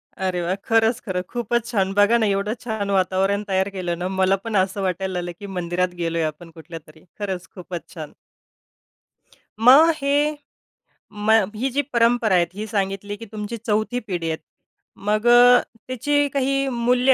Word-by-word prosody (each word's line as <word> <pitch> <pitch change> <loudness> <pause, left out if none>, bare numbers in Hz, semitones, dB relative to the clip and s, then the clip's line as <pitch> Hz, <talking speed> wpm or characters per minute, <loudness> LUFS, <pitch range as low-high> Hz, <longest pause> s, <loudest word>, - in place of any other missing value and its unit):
अरे 185 -2 -2
वाह! 175 +2 -1
खरंच, 225 +3 +1
खरं. 185 -4 -2
खूपच 240 -1 -1
छान. 195 -5 0
बघा 210 +3 +5
ना, 225 - +1
एवढं 200 +1 0
छान 220 -4 -4
वातावरण 195 +1 +1
तयार 190 0 0
केलं 175 -2 -2
ना, 180 - -2
मला 190 +1 +4
पण 225 -2 -3
असं 190 +1 +1
वाटायला 190 0 -2
लागलं, 175 -1 -3
की 205 - -8
मंदिरात 180 +1 -1
गेलोय 165 0 -1
आपण 155 +2 -5
कुठल्यातरी. 160 -1 -12 0.2
खरंच 190 -3 -4
खूपच 180 -2 -8
छान. 155 -4 -8 1.5
मग 270 +8 +7
हे 290 +1 +1 1.0
मग 220 -2 +4
ही 255 +5 -1
जी 280 +3 +1
परंपरा 235 -3 +3
आहे 175 -1 +4
ही 210 +3 -5
सांगितली 200 0 -2
की 230 - -9
तुमची 215 +1 -5
4थी 220 +2 -1
पिढी 180 -8 -4
आहे. 160 - -2 0.6
मग 210 +2 -1
अ, 245 +1 +7 0.3
त्याची 290 +3 +1
काही 275 0 +1
मूल्य 250 +2 +3
205 Hz, 160 wpm, -22 LUFS, 185-235 Hz, 1.5 s, मग